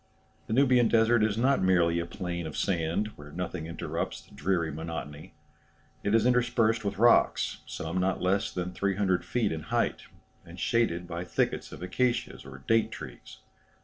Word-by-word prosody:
The -, -, -2 dB
Nubian 125 Hz, -2 st, +5 dB
desert 115 Hz, 0 st, +4 dB
is 110 Hz, -1 st, +1 dB
not 135 Hz, +4 st, +3 dB
merely 85 Hz, -3 st, +3 dB
a 85 Hz, -, -3 dB
plain 85 Hz, -2 st, -4 dB
of 75 Hz, -, -7 dB
sand, 90 Hz, +2 st, 0 dB
where 75 Hz, 0 st, -11 dB
nothing 90 Hz, -1 st, -4 dB
interrupts 85 Hz, -, -4 dB
the -, -, -19 dB
dreary 85 Hz, -1 st, 0 dB
monotony. 75 Hz, -1 st, -7 dB, 0.7 s
It 105 Hz, +2 st, +1 dB
is 115 Hz, 0 st, +3 dB
interspersed 120 Hz, -2 st, +2 dB
with 100 Hz, -1 st, -2 dB
rocks, 120 Hz, +3 st, +3 dB
some 85 Hz, +3 st, -3 dB
not 95 Hz, +1 st, 0 dB
less 95 Hz, +2 st, +1 dB
than 90 Hz, 0 st, -3 dB
300 95 Hz, -1 st, 0 dB
feet 115 Hz, -4 st, 0 dB
in 80 Hz, -1 st, -3 dB
height, -, -, -1 dB, 0.4 s
and 85 Hz, +2 st, -12 dB
shaded 90 Hz, -5 st, +1 dB
by 85 Hz, 0 st, -4 dB
thickets 90 Hz, -, -1 dB
of -, -, -9 dB
acacias 120 Hz, -, -1 dB
or 65 Hz, 0 st, -11 dB
date 115 Hz, -1 st, +3 dB
trees. -, -, -10 dB
95 Hz, 165 wpm, -28 LUFS, 85-115 Hz, 0.7 s, Nubian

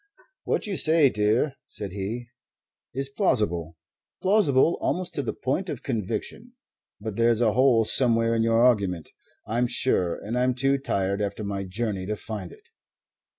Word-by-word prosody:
"What -, -, -1 dB
you 200 Hz, -4 st, -3 dB
say, 155 Hz, -4 st, +5 dB
dear," 110 Hz, +7 st, +1 dB
said 100 Hz, -3 st, -4 dB
he, 110 Hz, +5 st, -5 dB, 0.6 s
"is 135 Hz, +2 st, -1 dB
plausible. 105 Hz, -, -1 dB, 0.5 s
Plausible 175 Hz, -7 st, +3 dB
almost 180 Hz, -1 st, -2 dB
to 145 Hz, -, -1 dB
the 120 Hz, -, -3 dB
point 170 Hz, +9 st, -2 dB
of -, -, -5 dB
conviction. 115 Hz, -, -4 dB, 0.5 s
But 105 Hz, -1 st, -6 dB
there's 115 Hz, -1 st, +3 dB
a 115 Hz, -3 st, +2 dB
hole 125 Hz, -3 st, +4 dB
somewhere 115 Hz, -1 st, +4 dB
in 115 Hz, -, +1 dB
your 115 Hz, +1 st, +3 dB
argument, 100 Hz, -9 st, +1 dB, 0.3 s
I'm 120 Hz, +3 st, 0 dB
sure, 120 Hz, -8 st, +1 dB
and 115 Hz, +4 st, -4 dB
I'm 125 Hz, 0 st, +1 dB
too 135 Hz, +2 st, +1 dB
tired 100 Hz, -6 st, -1 dB
after 100 Hz, +1 st, -3 dB
my 100 Hz, -1 st, -3 dB
journey 95 Hz, -1 st, -3 dB
to 105 Hz, -, -2 dB
find 105 Hz, -5 st, -7 dB
it." -, -, -18 dB
115 Hz, 155 wpm, -25 LUFS, 100-135 Hz, 0.6 s, say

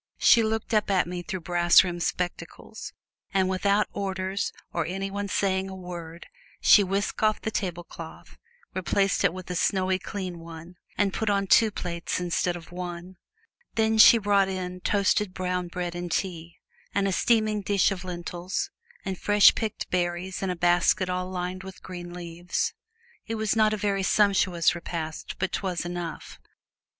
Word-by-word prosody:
She 235 Hz, -, +6 dB
looked 220 Hz, +1 st, -2 dB
up 210 Hz, -1 st, +2 dB
at 190 Hz, -2 st, +3 dB
me 175 Hz, +1 st, -5 dB
through 185 Hz, +1 st, -5 dB
brass 175 Hz, +1 st, +5 dB
rimmed 175 Hz, -2 st, -4 dB
spectacles, 175 Hz, +1 st, -4 dB, 0.4 s
and 190 Hz, -1 st, +3 dB
without 200 Hz, +2 st, +2 dB
orders 190 Hz, -1 st, -2 dB, 0.2 s
or 170 Hz, -, 0 dB
any 195 Hz, +2 st, -3 dB
one 200 Hz, 0 st, -3 dB
saying 190 Hz, -1 st, 0 dB
a 190 Hz, -, -7 dB
word 175 Hz, -2 st, -8 dB, 0.3 s
she 205 Hz, -, +7 dB
whisked 195 Hz, +2 st, -2 dB
off 215 Hz, -1 st, +2 dB
the 220 Hz, -, -3 dB
tablecloth, 175 Hz, -5 st, -6 dB, 0.4 s
replaced 195 Hz, +2 st, +1 dB
it -, -, +4 dB
with 185 Hz, 0 st, -8 dB
a -, -, -3 dB
snowy, 185 Hz, +1 st, +1 dB
clean 185 Hz, -3 st, -5 dB
one, 165 Hz, +1 st, -11 dB, 0.2 s
and 200 Hz, -2 st, +1 dB
put 220 Hz, -, -1 dB
on 200 Hz, -1 st, +1 dB
two 220 Hz, +3 st, +5 dB
plates 170 Hz, -4 st, -3 dB
instead 175 Hz, 0 st, 0 dB
of 170 Hz, 0 st, -10 dB
one. 175 Hz, 0 st, -7 dB, 0.6 s
Then 220 Hz, 0 st, +2 dB
she 230 Hz, -, +10 dB
brought 200 Hz, -2 st, +3 dB
in 180 Hz, -1 st, -4 dB
toasted 200 Hz, -1 st, +1 dB
brown 180 Hz, -1 st, -2 dB
bread 175 Hz, 0 st, -4 dB
and 175 Hz, 0 st, -5 dB
tea, 170 Hz, -1 st, -3 dB, 0.4 s
and 200 Hz, 0 st, +2 dB
a -, -, 0 dB
steaming 215 Hz, 0 st, +2 dB
dish 200 Hz, 0 st, +2 dB
of 190 Hz, -2 st, -4 dB
lentils, 180 Hz, -, -4 dB, 0.3 s
and 190 Hz, -2 st, -3 dB
fresh 205 Hz, -1 st, +6 dB
picked 220 Hz, -2 st, -4 dB
berries 180 Hz, +1 st, -1 dB
in 195 Hz, -, -1 dB
a 180 Hz, -, -1 dB
basket 175 Hz, +2 st, +2 dB
all 180 Hz, 0 st, -2 dB
lined 180 Hz, 0 st, -4 dB
with 190 Hz, 0 st, -11 dB
green 175 Hz, -1 st, -7 dB
leaves. 175 Hz, 0 st, -3 dB, 0.5 s
It 225 Hz, -, -2 dB
was 220 Hz, -1 st, 0 dB
not 215 Hz, -1 st, +4 dB
a 215 Hz, -, -1 dB
very 200 Hz, -1 st, 0 dB
sumptuous 190 Hz, -4 st, +3 dB
repast, 165 Hz, -2 st, -5 dB
but 190 Hz, 0 st, -1 dB
't -, -, -1 dB
was 185 Hz, -3 st, -2 dB
enough. 175 Hz, -2 st, -6 dB
185 Hz, 170 wpm, -26 LUFS, 175-200 Hz, 0.6 s, she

